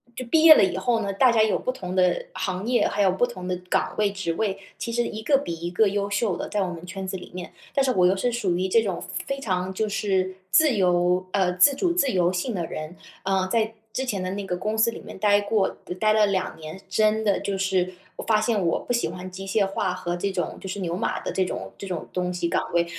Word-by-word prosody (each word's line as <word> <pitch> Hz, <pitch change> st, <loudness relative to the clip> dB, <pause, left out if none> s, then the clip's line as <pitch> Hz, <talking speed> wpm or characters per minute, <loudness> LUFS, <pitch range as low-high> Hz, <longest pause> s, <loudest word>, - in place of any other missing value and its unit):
就 255 Hz, -, -4 dB
毕 315 Hz, +6 st, +3 dB
业 320 Hz, -1 st, +11 dB
了 -, -, +5 dB
以 185 Hz, -2 st, +1 dB
后 230 Hz, +4 st, +1 dB
呢， 200 Hz, -2 st, -2 dB
大 245 Hz, +5 st, +4 dB
家 225 Hz, -2 st, +3 dB
有 215 Hz, -1 st, +3 dB
不 255 Hz, -, -2 dB
同 185 Hz, -7 st, -6 dB
的 180 Hz, -1 st, +2 dB
行 185 Hz, +4 st, -3 dB
业， 245 Hz, -1 st, +3 dB
还 205 Hz, -, -1 dB
有 190 Hz, -2 st, +4 dB
不 190 Hz, +6 st, +2 dB
同 185 Hz, -7 st, -8 dB
的 180 Hz, -, 0 dB, 0.2 s
岗 -, -, +1 dB
位 205 Hz, -1 st, +2 dB
职 195 Hz, -4 st, -3 dB
位， 195 Hz, +2 st, -2 dB, 0.2 s
其 235 Hz, -, -4 dB
实 240 Hz, +1 st, 0 dB
一 220 Hz, +1 st, -6 dB
个 280 Hz, +3 st, +3 dB
比 170 Hz, -11 st, -4 dB
一 170 Hz, +1 st, -5 dB
个 205 Hz, +4 st, +3 dB
优 200 Hz, 0 st, -1 dB
秀 205 Hz, -2 st, 0 dB
的， -, -, -4 dB
在 205 Hz, -2 st, 0 dB
我 185 Hz, -, -1 dB
们 170 Hz, 0 st, -8 dB
圈 190 Hz, +1 st, -6 dB
子 190 Hz, 0 st, -3 dB
里 180 Hz, -, -12 dB
面。 180 Hz, -1 st, -7 dB, 0.2 s
但 275 Hz, -, +2 dB
是 260 Hz, -, +2 dB
我 180 Hz, -1 st, +4 dB
又 185 Hz, -, +4 dB
是 245 Hz, +6 st, 0 dB
属 200 Hz, -7 st, 0 dB
于 185 Hz, +1 st, 0 dB
这 225 Hz, +4 st, +4 dB
种 195 Hz, -5 st, -3 dB, 0.2 s
非 275 Hz, 0 st, -3 dB
常 185 Hz, -6 st, -2 dB
就 215 Hz, +2 st, -1 dB
是 190 Hz, -2 st, 0 dB, 0.2 s
自 295 Hz, +4 st, +5 dB
由 180 Hz, -1 st, +2 dB
呃， 185 Hz, -3 st, +2 dB
自 230 Hz, +11 st, +6 dB
主 340 Hz, +5 st, 0 dB
自 280 Hz, -7 st, +2 dB
由 180 Hz, -2 st, +2 dB
性 185 Hz, +7 st, -2 dB
的 170 Hz, -4 st, -2 dB
人 155 Hz, +3 st, -6 dB, 0.3 s
呃， 190 Hz, -1 st, +1 dB
在 225 Hz, -1 st, +1 dB, 0.2 s
之 265 Hz, +3 st, -2 dB
前 205 Hz, -6 st, -2 dB
的 185 Hz, -, -2 dB
那 200 Hz, 0 st, -4 dB
个 180 Hz, -, -2 dB
公 215 Hz, +4 st, -2 dB
司 225 Hz, +1 st, +3 dB
里 -, -, -8 dB
面 -, -, -10 dB
待 205 Hz, +1 st, +3 dB
过 205 Hz, -1 st, +1 dB, 0.3 s
待 215 Hz, 0 st, +3 dB
了 215 Hz, -1 st, +4 dB
2 190 Hz, -2 st, -1 dB
年， 155 Hz, +4 st, -8 dB
真 215 Hz, +3 st, +2 dB
的 205 Hz, -2 st, +2 dB
就 200 Hz, -1 st, -2 dB
是 185 Hz, -1 st, 0 dB, 0.2 s
我 -, -, -6 dB
发 220 Hz, -2 st, +3 dB
现 215 Hz, -3 st, +1 dB
我 170 Hz, -, +1 dB
不 -, -, -6 dB
喜 235 Hz, -, +1 dB
欢 180 Hz, +2 st, -7 dB
机 195 Hz, +1 st, -7 dB
械 200 Hz, +1 st, +2 dB
化 195 Hz, -1 st, -1 dB
和 180 Hz, -1 st, -3 dB
这 195 Hz, +3 st, -2 dB
种 180 Hz, -2 st, -3 dB
就 190 Hz, -, -8 dB
是 200 Hz, +2 st, -4 dB
牛 175 Hz, -2 st, -2 dB
马 230 Hz, -, -1 dB
的 -, -, -4 dB
这 190 Hz, -, +1 dB
种 -, -, -5 dB
这 195 Hz, -, -6 dB
种 180 Hz, -4 st, -4 dB
东 180 Hz, 0 st, -1 dB
西 175 Hz, -1 st, -1 dB
岗 -, -, -1 dB
位。 170 Hz, 0 st, +3 dB
195 Hz, 285 characters per minute, -25 LUFS, 180-220 Hz, 0.3 s, 业